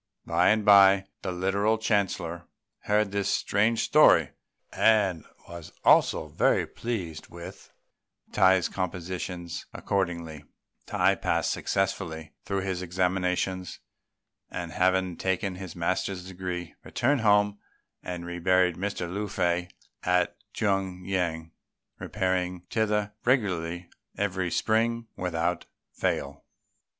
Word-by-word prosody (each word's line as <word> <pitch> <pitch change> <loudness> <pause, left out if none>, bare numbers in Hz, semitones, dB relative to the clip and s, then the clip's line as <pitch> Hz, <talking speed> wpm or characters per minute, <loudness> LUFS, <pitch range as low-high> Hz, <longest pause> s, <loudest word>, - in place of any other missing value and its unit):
By 85 +2 +3
and 110 -1 +2
by 100 -1 +7 0.2
the 95 - -3
Literary 100 +5 +1
Chancellor 95 -6 -1 0.4
heard 105 -1 +2
this 100 -1 -1
strange 110 +4 +1
story, - - +5 0.4
and 100 -7 +3 0.2
was 85 -2 -9
also - - +4
very - - +2
pleased 95 -10 -5
with 85 0 -11 0.6
Tai's 95 -2 +4
compositions; 90 -1 -5
accordingly, 85 -6 -2 0.4
Tai - - +3
passed - - 0
successfully 85 -5 -2
through 100 -1 -1
his 95 -1 -3
examinations, 90 0 -1 0.7
and, 90 -2 -5
having 95 0 +1
taken 95 0 -1
his 90 -2 -8
master's 90 +1 -2
degree, 90 -2 -5
returned 135 +1 0
home 105 -1 +3 0.4
and 90 -1 -6
reburied 90 0 +2
Mr. 95 -2 -3
Lung 100 +4 -3
fei 90 -2 0 0.3
at 90 -1 +1 0.2
Tung 95 -3 -1
yüan, 85 -4 -2 0.5
repairing 90 -1 -1
thither 105 -2 0
regularly 90 -9 0 0.3
every 95 -3 -1
spring 115 +5 +1
without 90 -1 -2 0.3
fail. 70 0 -2
95 Hz, 105 wpm, -27 LUFS, 85-100 Hz, 0.7 s, by